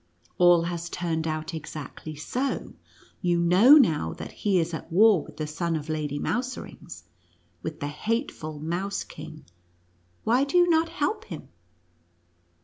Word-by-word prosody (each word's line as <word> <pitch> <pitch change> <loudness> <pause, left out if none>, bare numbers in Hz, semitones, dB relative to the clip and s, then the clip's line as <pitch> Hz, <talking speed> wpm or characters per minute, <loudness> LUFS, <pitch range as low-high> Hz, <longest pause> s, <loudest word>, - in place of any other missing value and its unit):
All 175 -1 +6
has 170 0 -4
turned 165 -2 -2
out 155 +1 -3
exactly 155 0 -7
so. 255 - -3 0.5
You 175 -1 +2
know 180 +10 +6
now 160 - +3
that - - -8
he 200 -3 0
is 170 0 0
at 160 - -6
war 205 0 +6
with - - -13
the 155 - -2
son 165 +2 -2
of 155 0 -5
Lady 150 -2 -2
Mouserings 250 - -4 0.3
— - - -38
with 160 -1 -6
the 145 - -1
hateful 160 - -3
Mouse 175 +6 -2
King. 155 - -11 0.8
Why 245 +4 +3
do 280 +5 +1
you 350 0 +6
not 330 -1 +3
help 330 +6 -2
him?" 165 -6 -9
170 Hz, 150 wpm, -26 LUFS, 155-225 Hz, 0.8 s, All